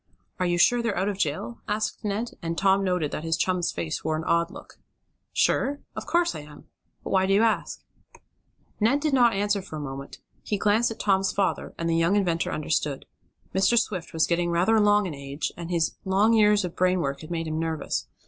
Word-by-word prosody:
"Are 180 - +1
you 175 0 +1
sure 240 +7 +4
they're 230 -3 -1
out 190 +3 +1
of 200 -1 -4
jail?" 140 -8 -2
asked 215 +2 -2
Ned, 210 +3 -2
and 165 0 -3
Tom 195 0 +3
noted 180 -6 0
that 155 - -4
his 165 0 0
chum's 180 0 0
face 85 -2 -4
wore 155 0 0
an 160 - -4
odd 170 +1 +1
look. - - -13 0.5
"Sure? 285 +2 +1 0.2
Of - - -6
course 345 0 +2
I - - -6
am. 150 0 -13 0.4
But - - -6
why 190 -1 +3
do 195 - +3
you 210 - +4
ask?" 225 -1 0 1.0
Ned 230 +7 +3
did 300 -1 -1
not 245 -3 +5
answer 205 0 0
for 170 - -9
a - - -4
moment. 140 -1 -7 0.2
He 210 - -2
glanced 215 +3 +2
at 225 - -7
Tom's 195 -2 +2
father, 195 0 -1
and 165 - -2
the 165 - +1
young 165 +4 +2
inventor 175 -5 0
understood. 150 -2 -1 0.5
Mr. 195 +5 +3
Swift 185 -7 -1
was 160 -1 +2
getting 175 0 0
rather 175 +6 +2
along 210 -1 +4
in 175 - -4
age, 140 +1 -4
and 170 0 -7
his 170 -2 0
long 200 +4 +3
years 210 -2 +4
of 175 - -6
brain 185 0 +2
work 140 -2 -3
had 155 - -10
made 165 -1 -2
him 155 0 -3
nervous. 160 -1 -2
185 Hz, 215 wpm, -26 LUFS, 165-210 Hz, 1.0 s, not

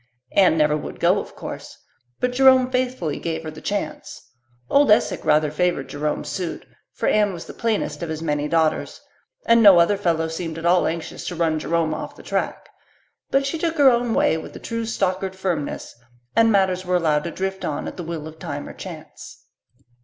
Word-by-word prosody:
Anne 185 -4 +4
never 150 -1 +3
would 150 - -6
go, - - +3
of - - -9
course, - - -8 0.4
but 250 0 0
Jerome 260 0 +5
faithfully 250 - -1
gave 165 -1 -3
her 155 - -6
the 155 - -11
chance. 200 -6 -5 0.4
Old 285 -2 +4
Esek 210 - +3
rather 150 0 +3
favoured 175 -3 0
Jerome's 150 +1 -3
suit, 180 -3 -4 0.3
for - - -3
Anne 210 -2 +3
was 170 - -8
the - - -10
plainest 225 -5 -2
of 170 - -4
his 160 -1 -3
many 150 -2 -1
daughters, 160 -1 0 0.5
and 230 0 +5
no 200 -4 +9
other 200 +4 +3
fellow 165 -4 0
seemed 160 0 -5
at 165 - -6
all 175 +1 +4
anxious 165 0 -5
to 180 - -4
run 160 -2 +1
Jerome 165 0 0
off 155 - -6
the - - -14
track; - - -3 0.6
but 275 0 +2
she 310 +4 -2
took 330 0 -1
her 280 -3 +7
own 240 -1 0
way 160 - +2
with - - -9
true 230 -1 -3
Stockard 190 -3 -1
firmness, 180 -6 -3 0.4
and 225 0 +5
matters 190 -2 +2
were 180 0 0
allowed 155 -4 +2
to - - -2
drift 190 +2 -4
on 150 - -3
at - - -6
the 175 - -6
will 160 -2 -5
of 160 0 -12
time - - -5
or - - -8
chance. - - -10
180 Hz, 200 wpm, -22 LUFS, 160-215 Hz, 0.6 s, no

